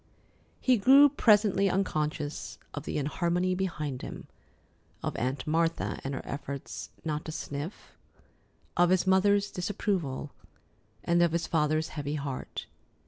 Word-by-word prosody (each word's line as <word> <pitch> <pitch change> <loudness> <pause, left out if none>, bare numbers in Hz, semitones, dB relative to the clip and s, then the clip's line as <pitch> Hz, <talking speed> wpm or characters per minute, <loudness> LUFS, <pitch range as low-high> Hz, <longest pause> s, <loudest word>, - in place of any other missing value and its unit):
He 255 -2 +4
grew 275 +7 +7
presently 205 -6 +4
unconscious 155 -5 -2 0.2
of 150 0 -6
the - - -2
inharmony 170 +5 0
behind 155 -8 -3
him: - - -7 0.8
of - - -2
Aunt 130 +3 -2
Martha 165 +1 0
and 135 0 -3
her - - -5
efforts 140 0 -6 0.2
not 150 -1 -2
to 160 - -4
"sniff"; 150 +3 -6 0.8
of 175 0 +4
his 185 -1 +3
mother's 200 +2 +3
disapproval; 180 -7 -2 0.7
and 170 0 +3
of 170 -2 +3
his 170 0 0
father's 155 0 +1
heavy 145 -1 -3
heart. 140 -3 -5
165 Hz, 130 wpm, -29 LUFS, 145-190 Hz, 0.8 s, grew